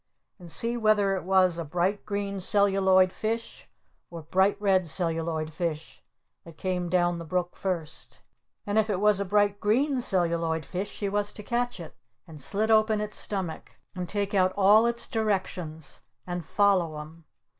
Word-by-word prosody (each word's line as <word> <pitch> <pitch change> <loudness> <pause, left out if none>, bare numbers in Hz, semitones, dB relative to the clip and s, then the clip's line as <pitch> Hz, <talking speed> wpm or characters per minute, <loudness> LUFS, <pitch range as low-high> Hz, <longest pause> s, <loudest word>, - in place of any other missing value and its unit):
And 175 -2 -11
see 230 +8 0
whether 210 -3 +3
it 185 - -4
was 185 -2 +3
a - - -2
Bright 180 +7 -1
Green 200 -1 -3
Celluloid 190 -1 +3
Fish 225 +1 -4 0.4
or 170 -1 -8
a - - -17
Bright 190 +6 +2
Red 190 -3 +2
Celluloid 165 -2 -2
Fish 160 - -4 0.4
that 165 -2 -14
came 180 -2 -2
down 175 -1 +1
the - - -6
brook 175 +2 -2
first! 170 -5 -5 0.4
And 205 +1 +1
if 220 0 +1
it 195 -3 0
was 210 -1 +3
a 200 - -1
Bright 205 +1 +2
Green 255 +5 +1
Celluloid 170 -6 0
Fish 190 +6 -4
she 200 - -4
was 205 +1 -1
to 210 - -9
catch 240 0 -2
it! 165 -3 -10 0.3
And 155 -4 -11
slit 210 +11 0
open 215 -1 +4
its 210 0 -3
stomach! 190 -6 -5 0.2
And 180 -2 -5
take 205 0 -2
out 185 -1 +3
all 210 +4 +6
its 235 0 -2
Directions! 190 - -3 0.2
And 175 -1 -4
follow 185 -3 +2
'em! 155 +2 -11
190 Hz, 170 wpm, -27 LUFS, 170-205 Hz, 0.4 s, all